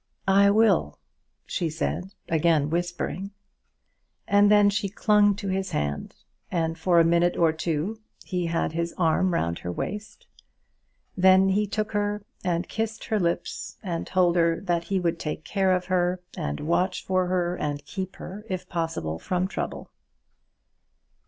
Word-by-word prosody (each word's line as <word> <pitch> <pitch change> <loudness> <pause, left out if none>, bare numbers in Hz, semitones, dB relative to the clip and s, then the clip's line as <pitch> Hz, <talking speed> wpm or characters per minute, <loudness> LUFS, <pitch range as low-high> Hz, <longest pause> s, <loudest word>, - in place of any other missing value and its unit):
"I 200 +1 +6
will," 200 - +3 0.5
she 170 - -2
said, 165 +3 -3 0.2
again 160 -2 +2
whispering; 175 +3 -2 1.0
and 205 0 +5
then 205 -1 +6
she 200 0 -1
clung 205 0 +3
to 200 0 -6
his 190 0 -1
hand, 75 0 -2 0.3
and 165 -2 -1
for 170 +1 +3
a - - +7
minute 170 +1 +3
or 165 -2 +4
two 165 +6 -2 0.3
he 180 -2 -2
had 165 -1 0
his 170 +1 -3
arm 180 +2 +2
round 85 - -1
her 90 - -4
waist. 210 - -6 0.9
Then 190 +1 +5
he 205 +2 +1
took 215 +1 -2
her, 205 0 -1 0.2
and 175 -1 -1
kissed 220 0 -3
her 215 - 0
lips, 170 -1 -2
and 170 -4 -3
told 180 -1 +2
her 165 -1 +3
that 175 -3 -1
he 195 +2 0
would 170 -2 -1
take 155 0 -4
care 190 +3 +1
of 180 -1 +1
her, 180 -1 +1 0.2
and 70 0 -3
watch 180 +4 0
for 185 -1 +1
her, 180 -1 0
and 145 -3 -3
keep 190 -2 -5
her, 200 +3 -8
if 185 -1 -4
possible, 165 - -3
from 180 - -1
trouble. 200 - -5
180 Hz, 155 wpm, -26 LUFS, 165-195 Hz, 1.0 s, a